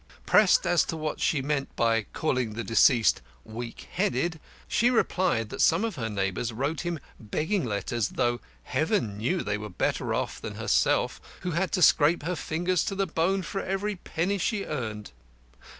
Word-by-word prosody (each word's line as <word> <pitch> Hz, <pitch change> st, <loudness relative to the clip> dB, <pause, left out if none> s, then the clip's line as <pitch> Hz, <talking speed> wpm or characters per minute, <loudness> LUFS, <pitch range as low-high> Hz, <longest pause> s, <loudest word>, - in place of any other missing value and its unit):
Pressed 210 Hz, -3 st, +5 dB
as 175 Hz, -, +4 dB
to 165 Hz, -, -4 dB
what 155 Hz, -1 st, -3 dB
she 140 Hz, -4 st, +1 dB
meant 140 Hz, -1 st, -2 dB
by 115 Hz, -2 st, +1 dB
calling 125 Hz, -7 st, -1 dB
the 115 Hz, +2 st, -4 dB
deceased 115 Hz, 0 st, +4 dB, 0.2 s
"weak 115 Hz, +1 st, -7 dB
headed," 175 Hz, -4 st, 0 dB, 0.3 s
she 240 Hz, +1 st, +3 dB
replied 185 Hz, -, +1 dB
that -, -, -4 dB
some 170 Hz, +7 st, +4 dB
of 225 Hz, -, -2 dB
her 115 Hz, -6 st, -3 dB
neighbours 100 Hz, +3 st, -2 dB
wrote 140 Hz, +7 st, -2 dB
him 175 Hz, -1 st, -2 dB, 0.2 s
begging 160 Hz, -, -1 dB
letters, 105 Hz, 0 st, -1 dB
though, 120 Hz, 0 st, 0 dB, 0.2 s
Heaven 105 Hz, -, -1 dB
knew, 170 Hz, +12 st, 0 dB
they 105 Hz, 0 st, -2 dB
were 105 Hz, 0 st, -6 dB
better 90 Hz, -, -1 dB
off -, -, -2 dB
than -, -, -6 dB
herself, -, -, +1 dB, 0.2 s
who 180 Hz, -, -2 dB
had 180 Hz, +3 st, 0 dB
to 180 Hz, -, +3 dB
scrape 155 Hz, +1 st, +5 dB
her 180 Hz, +3 st, -1 dB
fingers 175 Hz, +3 st, 0 dB
to 195 Hz, -, -2 dB
the 195 Hz, 0 st, +1 dB
bone 185 Hz, +3 st, 0 dB
for 195 Hz, +4 st, -3 dB
every 195 Hz, +2 st, -2 dB
penny 185 Hz, +2 st, -2 dB
she 205 Hz, +1 st, -1 dB
earned. 110 Hz, -8 st, -5 dB
155 Hz, 175 wpm, -27 LUFS, 115-180 Hz, 0.3 s, Pressed